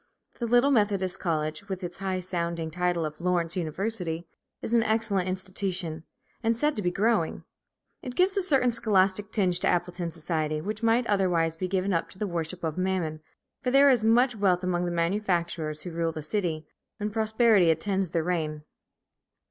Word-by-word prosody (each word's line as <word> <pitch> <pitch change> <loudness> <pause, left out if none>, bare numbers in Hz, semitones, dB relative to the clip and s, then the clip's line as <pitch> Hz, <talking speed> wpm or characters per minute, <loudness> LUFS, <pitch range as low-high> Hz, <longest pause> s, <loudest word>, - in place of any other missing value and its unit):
The 235 - -1
little 245 +4 +4
Methodist 200 -6 +1
college, 155 +2 -2
with 190 -1 -4
its 175 +1 -6
high 190 -1 -2
sounding 170 -3 -3
title 175 -1 0
of 155 +1 -7
Lawrence 175 -1 0
University, 175 -1 -3 0.3
is 230 - -4
an 235 - +5
excellent 220 -4 +1
institution, 185 -3 -2 0.4
and 225 0 +1
said 295 +4 +1
to 210 - -2
be 180 - +1
growing; 205 -2 0 0.6
it 250 -1 -7
gives 375 +2 +3
a 395 - +2
certain 270 -9 +3
scholastic 205 -2 +2
tinge 180 -4 +1
to - - 0
Appleton 175 0 -1
society, 155 -2 -2
which 210 +6 -4
might 230 +2 +3
otherwise 180 -6 +1
be 185 +3 -3
given 190 +1 0
up 165 - -1
to - - -11
the 210 - -2
worship 170 -1 -4
of 160 +1 -2
Mammon, 180 -5 -1 0.4
for 250 - -1
there 275 +2 +6
is 240 -4 +3
much 240 +2 +4
wealth 190 -3 +2
among 180 -1 0
the 175 - -2
manufacturers 170 -3 -1
who 180 - -6
rule 165 0 -1
the 155 -2 -6
city, 160 -2 -2 0.3
and 210 0 -3
prosperity 220 -4 +3
attends 190 +3 0
their 165 -1 0
reign. 155 -3 -2
185 Hz, 180 wpm, -27 LUFS, 170-215 Hz, 0.6 s, there